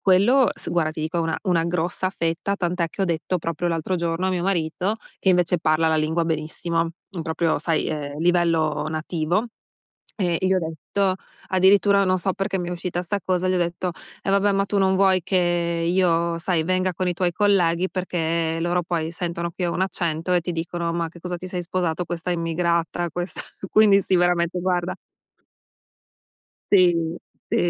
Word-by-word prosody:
quello 210 +8 +4
s - - -7
guarda, 165 -3 +1
ti 155 - -6
dico, 160 +2 -3
è - - +2
una 165 -1 -1
una 175 -4 +1
grossa 175 +2 -1
fetta, 165 +3 -1
tant'è 175 -2 0
che 195 - -4
ho - - +3
detto, 175 +1 -1
proprio 165 +1 -3
l'altro 165 +2 -1
giorno, 170 +1 -1
a - - +1
mio 180 -2 -1
marito, 185 +3 0 0.2
che, 190 - 0
invece, 180 -1 +2
parla 160 0 +2
la 160 - +2
lingua 160 +2 +1
benissimo, 165 +1 -1 0.2
mhmm, 175 -4 -5
proprio, 160 0 0
sai, 160 +1 0
ehm, 145 -2 -4
livello 165 -3 +2
nativo, 160 +5 -1 0.7
ehm, 175 -5 +1
gli 185 0 +2
ho - - +3
detto 180 +4 -1 0.3
addirittura 200 +2 +4
non 185 -1 +2
so 190 +1 0
perché 195 +1 -2
mi 175 -1 -3
è - - -4
uscita 175 0 -3
'sta 190 +3 -2
cosa, 185 0 0
gli 185 - +2
ho - - +2
detto: 175 +1 -1 0.3
"Eh - - -1
vabbè, 200 +1 +3
ma 195 0 +2
tu 200 0 -1
non 190 -1 +3
vuoi 190 -1 +4
che 190 - -1 0.5
io, 170 -2 +2
sai, 170 -2 0
venga 185 +1 0
con 185 +2 -2
i - - +1
tuoi 175 0 0
colleghi 185 -3 +2
perché 165 -3 -1
loro 175 +1 +1
poi 165 -2 -2
sentono 170 0 -3
che 180 - -1
ho 170 - -1
un 185 - 0
accento 170 -2 -1
e 180 - +4
ti 175 +1 -4
dicono: 170 0 -3
ma 170 -1 -1
che 170 - -15
cosa 180 +1 -4
ti 180 - -8
sei 180 -1 -3
sposato? 175 -1 -1
Questa 175 +1 -4
immigrata, 170 0 0
questa" 175 +3 -5 0.3
quindi 210 -2 +6
sì, 190 -1 +1
veramente, 175 0 +2
guarda 180 0 -1 1.8
Sì, 185 -3 +6 0.5
sì - - 0
175 Hz, 190 wpm, -23 LUFS, 165-185 Hz, 1.8 s, quindi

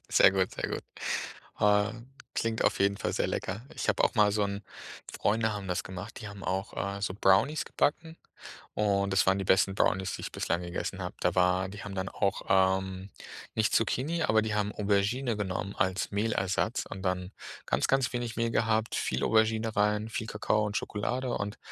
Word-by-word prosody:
Sehr - - +7
gut, 95 -1 0
sehr - - -3
gut. - - -4 0.8
Ähm, 105 +4 +2 0.2
klingt 115 -1 0
auf - - +2
jeden 100 0 +2
Fall - - -2
sehr - - +1
lecker. 105 +5 -3
Ich - - -4
habe - - +3
auch - - +1
mal 105 -1 +5
so 105 0 +1
'n 100 +1 -4 0.5
Freunde 110 +1 +1
haben 100 -2 -5
das 90 - -1
gemacht, 95 +6 -7
die 110 - -6
haben 100 -1 -10
auch, 95 +2 -2 0.2
äh, - - -7
so 95 - -1
Brownies 100 +10 +3
gebacken, 160 +2 -1 0.6
und 100 -2 +1
das 95 - +3
waren 95 +1 +4
die 95 - -2
besten 95 +1 +3
Brownies, 95 -2 +1
die - - -9
ich - - -5
bislang 85 +1 -1
gegessen 90 +2 -4
habe. 90 -1 -4
Da 90 +1 +1
war 90 +1 +3
die 105 +2 -8
haben 100 -1 -6
dann 95 0 -2
auch, 100 0 -1
ähm, 95 0 +2 0.4
nicht 110 0 +1
Zucchini 150 +9 +1
aber 110 0 +4
die 110 -1 -2
haben 105 0 0
Aubergine 105 +4 +1
genommen 100 0 -3
als 95 +1 0
Mehlersatz 100 -3 0
und 95 - -6
dann 90 0 -1 0.4
ganz, 65 - +1
ganz 135 -1 +2
wenig 120 -1 -3
Mehl 115 0 +1
gehabt, 110 -1 +1
viel 65 +2 -1
Aubergine 110 0 +2
rein, 105 +1 +2
viel 110 -1 -4
Kakao 105 0 0
und 105 0 -3
Schokolade. 125 +5 -2
Und 105 -1 -3
105 Hz, 195 wpm, -29 LUFS, 95-110 Hz, 0.8 s, Sehr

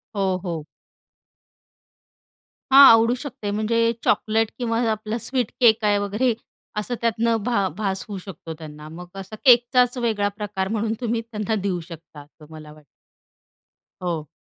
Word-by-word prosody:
हो, 190 -2 0
हो. 165 -4 -4 2.1
हां, 275 0 +11
आवडू 230 +2 +4
शकते 235 -7 -6
म्हणजे 215 +2 -1 0.3
चॉकलेट 220 0 +1
किंवा 230 -1 -1
आपला 215 +1 -3
स्वीट 255 -4 -1
केक 225 -2 +5
आहे 205 -1 +3
वगैरे 210 +5 0 0.5
असं 245 +3 -3
त्यातनं 230 0 +1
भा 200 -5 +1
भास 195 -3 -2
होऊ 200 -2 -6
शकतो 165 -3 -8
त्यांना 150 -1 -10
मग 180 0 -9
असा 195 +3 -8
केकचाच 245 0 +5
वेगळा 220 -4 0
प्रकार 200 -2 -3
म्हणून 220 +1 -1
तुम्ही 230 -1 -1
त्यांना 215 +1 -2
देऊ 185 -3 -1
शकता 165 -2 -12
असं 150 +1 -18
मला 155 -1 -11
वाटतं. 150 -1 -19 1.2
हो. 165 -4 -3
210 Hz, 140 wpm, -23 LUFS, 185-230 Hz, 2.1 s, हां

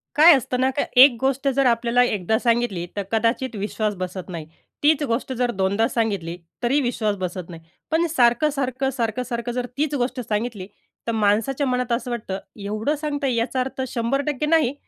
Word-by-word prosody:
काय 320 +4 +9
असतं 250 -1 -2
ना 260 +1 +3
का, - - +2
एक 260 0 +9
गोष्ट 270 +1 0
जर 275 -1 +3
आपल्याला 240 0 +3
एकदा 215 -2 0
सांगितली, 235 -7 0
तर 200 - -2
कदाचित 230 +3 0
विश्वास 210 +1 -2
बसत 185 0 -6
नाही, 165 -3 -6 0.4
तीच 300 0 +4
गोष्ट 260 0 -2
जर 245 -1 0
दोनदा 200 +2 +1
सांगितली, 200 -7 -2 0.3
तरी 260 +5 +3
विश्वास 225 -5 -1
बसत 185 -1 -5
नाही, 165 -2 -9 0.3
पण 325 +2 +3
सारखं, 255 -1 +3
सारखं, 270 -2 -1
सारखं, 230 +1 -1
सारखं 240 -1 -4
जर 245 0 -2
तीच 295 0 0
गोष्ट 255 -1 -1
सांगितली, 210 -3 -2 0.4
तर - - +1
माणसाच्या 225 +6 +1
मनात 250 -1 -1
असं 245 +1 -1
वाटतं, 215 -5 -4 0.3
एवढं 215 +8 -1
सांगता, 290 -2 -2
याचा 245 +1 0
अर्थ 260 +1 -2
100% 240 +3 -1
टक्के 295 0 -1
नाही, 305 -4 +3
240 Hz, 180 wpm, -23 LUFS, 215-265 Hz, 0.4 s, काय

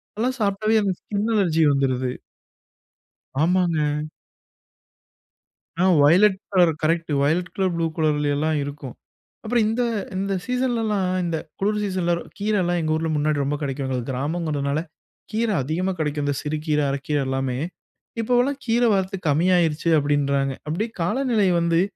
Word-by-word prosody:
அதெல்லாம் 250 +5 -1
சாப்பிட்டாலே 215 +2 +2
எனக்கு 195 -3 -1
ஸ்கின் 210 +2 -2
அலர்ஜி 170 -6 +2
வந்துருது. 130 -2 0 1.3
ஆமாங்க. 160 -4 +1 1.8
ஆ - - +4 0.2
violet 185 +7 +5 0.2
colour 180 -3 +5
correct, 165 0 0
violet 165 +5 +1
colour 190 -2 0
blue 165 0 0
கலர்லலாம் 150 -1 +1
இருக்கும். 140 -3 -7 0.5
அப்புறம் 235 0 +1
இந்த 225 +3 0 0.3
இந்த 195 +1 -1
சீசனலாம் 230 -7 0
இந்த 165 -1 -1 0.2
குளிர் 210 +2 +1
சீசன்ல, 185 -3 0 0.3
கீரலாம் 190 -4 +1
எங்க 155 -1 -1
ஊர்ல 160 +1 -1
முன்னாடி 150 0 +1
ரொம்ப 140 +2 -1
கெடைக்குங்க. 135 -2 -3
அது 125 - -3
கிராமங்கிறனால 145 +1 -1 0.5
கீரை 220 0 0
அதிகமா 165 +8 -1
கெடைக்கும். 150 -1 -1
இந்த 145 -1 0
சிறு 155 +1 -2
கீர, 150 -2 +1
அரக்கீர 140 +2 -2
எல்லாமே. 130 -1 -1 0.6
இப்போவலாம் 250 +4 +1
கீர 235 +1 +1
வரத்து 190 0 -1
கம்மியாயிருச்சு 165 +1 +2
அப்படின்றாங்க. 140 -1 +1
அப்படியே 175 +10 -2
காலநிலை 220 +2 +1
வந்து, 170 0 +2
170 Hz, 130 wpm, -23 LUFS, 150-200 Hz, 1.8 s, violet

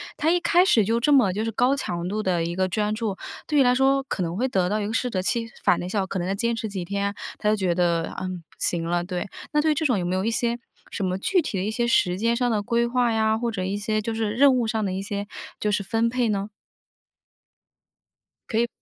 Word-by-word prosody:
他 310 - +1
一 355 - +3
开 350 +1 +4
始 230 - +4
就 230 +3 +1
这 265 +5 +2
么 245 -10 +5
就 210 +3 -2
是 225 - -2
高 250 +5 +2
强 175 -10 -3
度 210 +3 -2
的 175 -4 +1
一 170 +1 -3
个 185 0 0
专 210 +3 0
注， 215 -3 -3 0.3
对 300 -2 +2
于 - - +7
来 250 -1 +4
说 270 +1 +3
可 265 - -4
能 170 +2 -3
会 255 - +1
得 190 -8 +1
到 210 +2 0
一 205 - -2
个 220 - -4
适 250 +1 0
得 190 -5 -1
其 230 +4 0 0.2
反 175 - +3
的 175 - -4
效 200 +1 0
果， 190 - -3
可 190 - -3
能 175 - -2
要 195 - 0
坚 235 +3 0
持 225 -1 -4
几 190 -3 -4
天， 200 +2 -2 0.3
他 210 - +1
就 215 - +3
觉 190 -4 0
得， 170 -2 +1
嗯， 185 -1 -3
不 - - -25
行 170 -1 0
了， 175 0 0
对。 180 0 -4 0.3
那 300 - +4
对 310 +1 +2
于 - - +4
这 315 +2 -1
种 250 -7 +3
有 175 - -2
没 180 +1 -1
有 190 - 0
一 225 - +1
些 235 +1 0 0.3
什 205 - -3
么 185 0 -1
具 365 - +2
体 250 -10 -4
的 185 - -1
一 205 - -1
些 235 +1 0
时 180 -5 +2
间 230 +3 +1
上 245 0 +1
的 215 -3 +1
规 235 +3 +1
划 245 -1 +1
呀， 220 0 +2
或 235 0 -1
者 190 -4 -3
一 195 +2 -2
些 215 +1 -1
就 225 +2 -3
是 220 -2 -1
任 265 +4 +5
务 245 -2 +1
上 220 0 -1
的 190 - -1
一 190 - -3
些 205 0 -4 0.3
就 210 - 0
是 205 -1 0
分 225 +3 +1
配 245 -1 0
呢？ 200 0 -1 2.0
可 220 - -1
以， 235 - +1
215 Hz, 300 characters per minute, -24 LUFS, 190-235 Hz, 2.0 s, 于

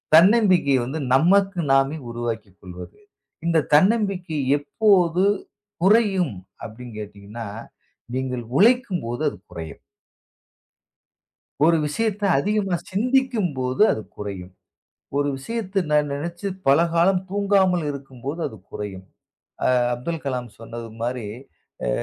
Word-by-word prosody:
தன்னம்பிக்கை 185 - +5
வந்து 150 +5 -4
நமக்கு 190 +6 +4
நாமே 135 +3 +3
உருவாக்கிக்கொள்வது. 100 - -7 0.5
இந்தத் 160 -3 +2
தன்னம்பிக்கை 185 -4 +2 0.2
எப்போது 175 +4 +3 0.6
குறையும் 195 - +3 0.3
அப்படின்னு 115 +1 -9
கேட்டீங்கன்னா, 105 +2 -8 0.7
நீங்க 130 -1 -2 0.2
உழைக்கும்போது 195 - +2
அது - - -11
குறையும். 80 -1 -8 1.8
ஒரு 165 0 +5
விஷயத்த 210 +5 -1
அதிகமா 195 0 0
சிந்திக்கும்போது 205 - +1
அது 110 - -4
குறையும். 95 -3 -6 0.6
ஒரு 145 0 +1
விஷயத்த 200 +2 -2
நான் 150 -1 +2
நினைச்சு 170 +6 -5 0.2
பல 140 +3 +6 0.2
காலம் 180 +2 +3
தூங்காமல் 195 -4 +2
இருக்கும்போது, 135 +3 -6
அது 110 - -12
குறையும். 95 -2 -6 0.6
அ, - - +4 0.3
அப்துல் 155 +6 -4
கலாம் 125 -3 -3
சொன்னது 115 0 -8
மாதிரி, 120 -2 -2 0.6
அ, - - 0
155 Hz, 100 wpm, -23 LUFS, 120-195 Hz, 1.8 s, பல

